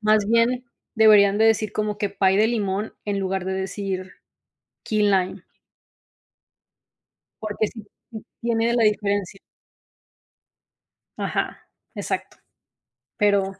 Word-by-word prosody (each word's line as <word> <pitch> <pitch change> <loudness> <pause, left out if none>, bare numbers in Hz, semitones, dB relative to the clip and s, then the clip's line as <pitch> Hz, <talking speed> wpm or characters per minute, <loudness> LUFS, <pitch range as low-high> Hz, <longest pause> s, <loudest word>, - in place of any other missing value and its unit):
más 215 -1 +3
bien 235 +2 +2 0.3
deberían 210 -2 +6
de 220 - +4
decir 220 -2 +3
como 210 -1 -2
que 205 -1 -1
pie 195 -1 +2
de 215 +2 +4
limón, 210 -2 -2
en 200 -1 -2
lugar 190 -1 -2
de 190 - -2
decir 190 -1 -4 0.7
key 215 -1 0
lime. 190 -3 +1 2.0
Porque 215 0 -1
sí, 220 -3 -11 0.3
sí 220 -2 -8 0.2
tiene 230 -1 +1
de 235 - +1
la 235 -2 +3
diferencia. 205 -2 0 1.8
Ajá. - - -2 0.4
Exacto. - - -4 0.8
Pero 200 -3 +1
205 Hz, 115 wpm, -23 LUFS, 195-220 Hz, 2.0 s, deberían